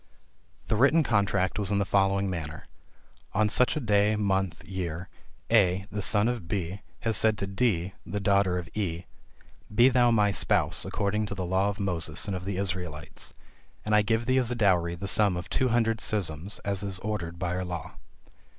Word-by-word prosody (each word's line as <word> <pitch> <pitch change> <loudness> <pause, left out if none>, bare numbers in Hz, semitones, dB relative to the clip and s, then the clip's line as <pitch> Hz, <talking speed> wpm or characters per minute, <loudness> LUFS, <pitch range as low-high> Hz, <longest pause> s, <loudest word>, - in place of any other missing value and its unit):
The - - 0
written 140 +8 +4
contract 100 -5 +1
was 100 -3 +1
in 100 - +2
the 100 - +1
following 100 0 +2
manner 80 -5 -5 0.7
"On 110 +1 +3
such 125 +4 +3
a - - -1
day, 105 -3 +2
month, 95 -4 -1
year, 90 -2 -5 0.4
A 95 -4 +3
the 105 - -3
son 105 +2 +3
of 120 -8 -3
B, 95 +1 -3 0.2
has 115 -1 0
said 110 +1 +4
to 100 - -2
D 95 -3 0
the 105 +4 -4
daughter 100 -2 +2
of 90 -2 -5
E, 90 -5 -3 0.7
be 120 +5 +5
thou 120 -1 +4
my 105 -3 +3
spouse - - +1
according 105 +1 -1
to 100 - -5
the 95 -2 -3
law 95 +3 +1
of 100 - -5
Moses 85 -5 -1
and 100 - -3
of 90 0 -6
the 100 -1 -3
Israelites; 90 -6 -4 0.5
and 105 - -1
I 105 - +6
give 110 +2 0
thee 130 +1 +3
as 125 -3 0
a 125 - -1
dowry 90 -6 +2
the 100 +3 -6
sum 100 -2 +3
of 90 - -7
two 130 - +2
hundred 115 -1 +1
suzims, 95 -3 -1
as 100 -1 0
it 100 - -3
is 95 -1 +1
ordered 85 -6 -4
by 90 0 -2
our 90 - -2
law. 85 -4 -6
100 Hz, 195 wpm, -27 LUFS, 90-105 Hz, 0.7 s, I